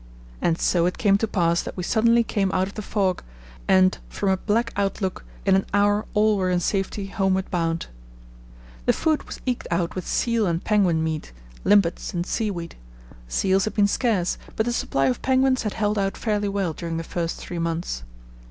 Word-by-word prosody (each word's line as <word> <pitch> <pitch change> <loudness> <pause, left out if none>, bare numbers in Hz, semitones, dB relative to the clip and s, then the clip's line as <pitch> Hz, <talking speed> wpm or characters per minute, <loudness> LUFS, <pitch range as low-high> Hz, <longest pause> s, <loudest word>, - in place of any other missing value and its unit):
'" - - -21
And 165 -1 +1
so 175 -1 +2
it 180 - -2
came 200 -2 +3
to 225 - 0
pass 170 -4 +1
that - - -8
we 180 - -3
suddenly 235 +4 +3
came 195 -4 0
out 185 0 +2
of 200 - -9
the 215 - -5
fog, 195 -3 0 0.5
and, 185 -1 +4
from 200 - -1
a 190 - +3
black 230 +4 0
outlook, 195 -1 -1 0.2
in 195 - +4
an 190 - +1
hour 205 +1 +2
all 210 0 +4
were 185 -1 0
in 180 -1 +2
safety 195 +2 -1
homeward 190 -1 0
bound. 165 -2 -1 1.0
The - - +5
food 315 -2 +1
was - - -8
eked 250 -2 -2
out 170 0 0
with 185 - -5
seal 230 -3 +1
and 170 0 -1
penguin 185 -7 +2
meat, 160 - -3 0.3
limpets, 195 -4 +2
and 175 0 -1
seaweed. 190 -6 -3 0.5
Seals 190 - +2
had 215 - -4
been 205 -2 +4
scarce, 200 -4 0 0.2
but 220 - +1
the 240 - 0
supply 135 -11 0
of 130 -2 0
penguins 260 0 +3
had 210 -3 -2
held 210 -1 0
out 195 0 -1
fairly 210 -2 0
well 195 -4 -1
during 165 0 -4
the 165 - -3
first 170 0 -3
three 175 - -6
months. 165 - -2
195 Hz, 200 wpm, -24 LUFS, 175-210 Hz, 1.0 s, The